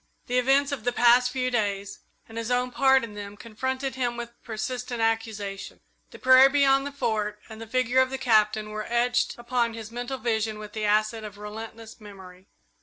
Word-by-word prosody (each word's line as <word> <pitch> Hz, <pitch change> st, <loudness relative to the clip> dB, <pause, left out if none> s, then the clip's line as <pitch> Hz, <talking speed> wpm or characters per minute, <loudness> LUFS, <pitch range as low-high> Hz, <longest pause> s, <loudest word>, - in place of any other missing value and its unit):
The 250 Hz, +1 st, +1 dB
events 275 Hz, +3 st, +3 dB
of 270 Hz, -6 st, -4 dB
the 245 Hz, -, +1 dB
past 245 Hz, +1 st, +5 dB
few 255 Hz, 0 st, -2 dB
days 200 Hz, -4 st, -2 dB, 0.3 s
and 225 Hz, -, -13 dB
his 230 Hz, 0 st, -4 dB
own 250 Hz, 0 st, 0 dB
part 265 Hz, 0 st, +4 dB
in 225 Hz, -2 st, -7 dB
them 205 Hz, 0 st, -8 dB
confronted 260 Hz, +5 st, -4 dB
him 245 Hz, -2 st, -2 dB
with 235 Hz, 0 st, -6 dB
persistent 245 Hz, +2 st, -4 dB
accusation. 225 Hz, -3 st, -2 dB, 0.3 s
The -, -, -12 dB
prairie 260 Hz, +1 st, +7 dB
beyond 275 Hz, -1 st, +3 dB
the -, -, -6 dB
Fort 210 Hz, -6 st, -2 dB
and 220 Hz, 0 st, -10 dB
the 225 Hz, -, -8 dB
figure 255 Hz, +2 st, +1 dB
of 260 Hz, -, +1 dB
the 265 Hz, -, -4 dB
Captain 215 Hz, -3 st, +2 dB
were 215 Hz, 0 st, -5 dB
etched 245 Hz, +1 st, +1 dB
upon 240 Hz, -1 st, -1 dB
his 225 Hz, -1 st, -8 dB
mental 245 Hz, +3 st, -4 dB
vision 220 Hz, -2 st, -1 dB
with 210 Hz, -1 st, -9 dB
the 215 Hz, -1 st, -2 dB
acid 215 Hz, +2 st, +1 dB
of 210 Hz, -1 st, -9 dB
relentless 220 Hz, +2 st, -9 dB
memory. 190 Hz, -2 st, -13 dB
230 Hz, 190 wpm, -26 LUFS, 215-250 Hz, 0.3 s, prairie